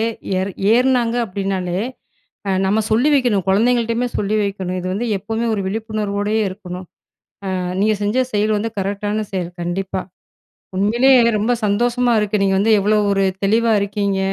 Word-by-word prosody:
ஏ - - +2 0.3
ஏறு 190 +1 -1 0.2
ஏறுனாங்க 245 -2 +2
அப்படினாலே, 190 -2 -2 0.7
அ - - +1 0.2
நம்ம 205 +3 +2
சொல்லி 240 +7 +3
வைக்கணும். 240 -9 +2
குழந்தைங்கள்ட்டயுமே 230 +3 +2
சொல்லி 210 +1 0
வைக்கணும். 190 -2 -3
இது 180 - -6
வந்து 220 +6 -2
எப்பவுமே 225 +4 -3
ஒரு 200 - -2
விழிப்புணர்வோடே 210 0 -2
இருக்கணும். 185 -1 -8 0.7
அ - - -1 0.2
நீங்க 215 +1 +3
செஞ்ச 235 +6 +1
செயல் 215 +1 +1
வந்து 225 +2 -2
கரெக்டான 205 +2 -2
செயல், 180 -2 -2
கண்டிப்பா. 185 +2 -3 0.7
உண்மையிலே 230 +7 +3 0.3
ரொம்ப 220 +4 +1
சந்தோஷமா 240 +4 +1
இருக்குது. 210 -1 0
நீங்க 195 -1 +2
வந்து 220 +3 +3
எவ்வளோ 210 +2 +2 0.2
ஒரு 195 0 +1 0.2
தெளிவா 225 +3 +2
இருக்கீங்க. 200 -1 -1
210 Hz, 145 wpm, -19 LUFS, 195-230 Hz, 0.7 s, சொல்லி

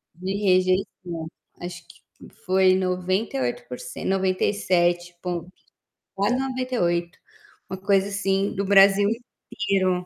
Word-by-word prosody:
De 185 +2 -4
rejeição. 185 -3 0 0.3
Acho 175 -1 -7
que - - -18 0.4
foi 185 0 +4
98 185 - -1
por 125 - -7
cen 125 - -7
97 185 -2 +1
ponto 180 0 -4 0.6
quase 205 +5 +1
98. 250 -11 -1 0.5
Uma 190 - -4
coisa 195 0 +2
assim, 195 0 0
do 200 - -1
Brasil 200 +1 +6 0.4
inteiro. 185 -7 0
185 Hz, 105 wpm, -24 LUFS, 175-195 Hz, 0.6 s, Brasil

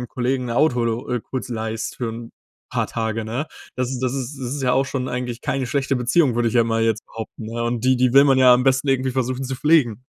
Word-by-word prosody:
deinem 125 - -6
Kollegen 125 +1 -1
'n - - -4
Auto 125 -2 +2
lo 115 +3 -2
äh, 125 -1 0
kurz 130 +3 -6
leihst 110 -1 -4
für'n 115 -1 -5 0.4
paar - - 0
Tage, 110 -1 -3
ne. 120 +8 -3 0.3
Das 125 0 -1
ist 130 -2 -4
das 130 0 0
ist 135 +1 -5
das 125 +1 -3
ist 145 - -4
ja 125 -1 +2
auch 135 +1 +2
schon 130 -1 -3
eigentlich 125 -1 -4
keine 135 -1 -1
schlechte 135 +2 0
Beziehung, 125 +2 +2
würd 120 0 +1
ich 115 - -1
ja 120 -2 +5
mal 115 0 0
jetzt 115 -1 0
behaupten, 110 0 -8
ne? 115 +1 -4
Und 120 0 -2
die 130 0 +4
die 125 -1 +2
will 140 +1 +8
man 135 -2 +4
ja 130 -1 +7
am 125 - +2
besten 135 +1 +2
irgendwie 130 -1 +1
versuchen, 130 +1 -2
zu 130 0 -3
pflegen. 130 -6 +2
125 Hz, 260 wpm, -22 LUFS, 115-130 Hz, 0.4 s, will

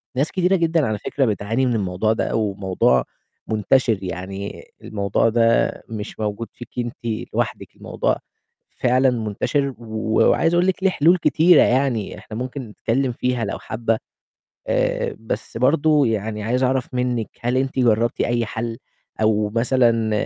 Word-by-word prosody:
ناس 140 +4 0
كتيرة 185 +1 +2
جدًا 165 -3 +2
على 110 -1 -1
فكرة 135 +5 0
بتعاني 110 +3 0
من 125 -2 +1
الموضوع 100 +1 0
ده - - -1
أو 105 -3 0
موضوع 95 -10 +2 0.4
منتشر، 110 +1 +2
يعني 95 +2 -6 0.2
الموضوع 100 +1 0
ده 115 0 +3 0.2
مش 105 -1 -6
موجود 105 +1 -3
فيكِ 120 - -11
أنتِ 120 +1 -3 0.4
لوحدِك، - - -3
الموضوع - - -1 0.6
فعلًا 130 +2 +4
منتشر 125 +5 -1
وعايز 110 +8 +1
أقول 175 +1 +3
لِك 190 0 -1
ليه 195 - +5
حلول 170 +2 +4
كتيرة 165 0 +5
يعني، 125 -5 0
إحنا 110 - -9
ممكن 130 +3 -4
نتكلّم 125 +5 -1
فيها 125 -1 -1
لو 100 - -4
حابة، 115 0 -1 0.7
آآ، - - 0
بس 110 0 -5
برضه 145 +2 +3
يعني 105 -1 -2
عايز 125 +4 0
أعرَف 130 0 0
منِّك 125 -3 -1
هل 120 +2 0
أنتِ 130 0 -1
جرَّبتِ 115 -1 +2
أي 120 -1 +1
حل 115 +1 -4 0.4
أو 105 -1 +2
مثلًا 115 -1 +2
115 Hz, 150 wpm, -21 LUFS, 110-130 Hz, 0.7 s, ليه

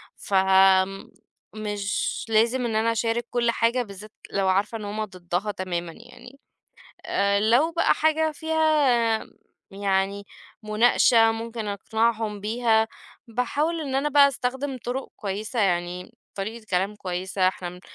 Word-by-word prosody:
فمش 195 +2 0
لازم 230 +3 +2
إن 225 -2 -2
أنا 225 +1 +2
أشارك 230 +1 -1
كل 235 -1 +1
حاجة، 235 +2 +1
بالذات 205 0 -11 0.2
لو 195 -1 0
عارفة 200 +4 +1
إن 215 - -7
هُم 215 +1 -3
ضدها 185 +1 -3
تمامًا 175 -3 -4 0.2
يعني. 275 +3 -14 0.7
آآ، 200 0 +1
لو 245 +10 +3
بقى 335 - +3
حاجة 315 0 +2
فيها 295 -8 +2 0.5
يعني 195 0 -1 0.4
مناقشة 225 +1 +4
ممكن 225 0 -5
أقنعهم 220 +1 -1
بيها، 220 +1 +1 0.4
باحاول 285 +8 -1
إن 275 -4 -4
أنا 275 +2 +1
بقى 285 -1 +6
أستخدم 265 +1 -3
طرق 255 +2 -3
كويسة، 215 +3 -3
يعني 180 +3 -1 0.2
طريقة 215 +3 -5
كلام 190 +3 0
كويسة، 185 0 -1
إحنا 180 -1 -6
220 Hz, 125 wpm, -25 LUFS, 195-245 Hz, 0.7 s, بقى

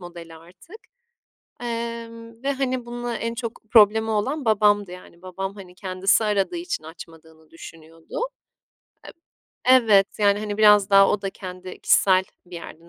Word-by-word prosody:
modeli 170 -2 -11
artık. 185 - -16 0.9
Emm, 230 0 -6
ve, 280 - 0
hani, 255 -3 -3
bununla 240 0 -5
en 230 0 -4
çok 230 -1 -6
problemi 220 0 +5
olan 260 +7 -2
babamdı 205 -3 +2
yani 180 -1 -14
babam, 190 +1 -6
hani, 185 -3 -13
kendisi 190 +3 0
aradığı 210 - 0
için 340 - -5
açmadığını 160 -1 -14
düşünüyordu. 165 - -11 1.5
Eb 255 -1 +7
Evet, 200 -2 +5
yani, 205 -1 +3
hani, 210 0 -5
biraz 210 -1 +5
daha 195 0 +6
o 205 - -1
da 195 - -3
kendi 185 -1 -10
kişisel 190 -1 +3 0.2
bir 175 -1 -10
yerden 170 0 -12
205 Hz, 145 wpm, -23 LUFS, 180-230 Hz, 1.5 s, Eb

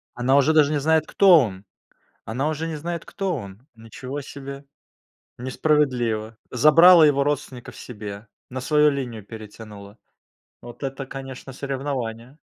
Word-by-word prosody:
Она 125 +3 +2
уже 140 +2 +4
даже 150 -2 +4
не 150 - 0
знает, 160 +1 +2
кто 190 -4 +6
он. 100 -8 -2 0.6
Она 130 +7 -2
уже 155 +1 -3
не 160 -1 -4
знает, 170 +3 -5
кто 195 -3 -3
он. 100 -1 -9
Ничего 125 +5 -8
себе. 140 0 -9 0.7
Несправедливо. 125 -5 0
Забрала 165 +6 +7
его 140 -2 +3
родственников 145 -4 -4
себе. 105 -2 -9 0.2
На 130 +1 -6
свою 150 +2 +3
линию 125 -7 -5
перетянула. 105 -1 -11 0.6
Вот 120 +3 -12
это, 135 0 -5
конечно, 135 0 -9
соревнование. 130 -2 -5
135 Hz, 135 wpm, -23 LUFS, 115-150 Hz, 0.7 s, Забрала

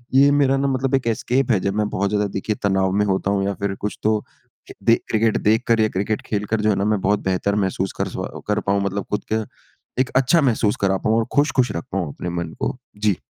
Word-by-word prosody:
ये 140 +1 +7
मेरा 140 -1 +3
ना 140 +1 +1
मतलब 135 0 +1
एक 130 -3 -1
एस्केप 125 +4 +1
है 105 - +3
जब 100 +1 -1
मैं 105 -1 +1
बहुत 100 0 -1
ज़्यादा 105 -1 +1
देखिए 105 +2 -2
तनाव 95 -1 +2
में - - +2
होता 95 0 0
हूँ। 100 -1 +1
या 100 - 0
फिर 100 -1 -1
कुछ 105 - -3
तो 110 0 +1 0.6
दे 115 - +6
क्रिकेट 110 0 +2
देखकर 115 +2 +2
या 110 - +4
क्रिकेट 105 +2 -1
खेलकर 105 +1 -1
जो 105 - +2
है 105 - +3
ना 100 - 0
मैं 105 -1 +1
बहुत 100 +2 +2
बेहतर 95 +2 0
महसूस 95 -2 -1
कर - - 0
स्व - - -5 0.2
कर 105 0 +1
पाऊँ, 100 0 0
मतलब 100 0 -2
खुद 105 - -1
का 110 0 0 0.5
एक 130 - +2
अच्छा 135 +6 +4
महसूस 115 -6 +2
करा 95 -1 +2
पाऊँ 110 +3 +1
और 115 - +1
खुश-खुश 145 -3 +2
रख 85 - -3
पाऊँ 95 -3 -1
अपने 90 - -5
मन 85 -2 -4
को। - - -2 0.2
जी। 105 -2 +1
105 Hz, 240 wpm, -21 LUFS, 100-115 Hz, 0.6 s, ये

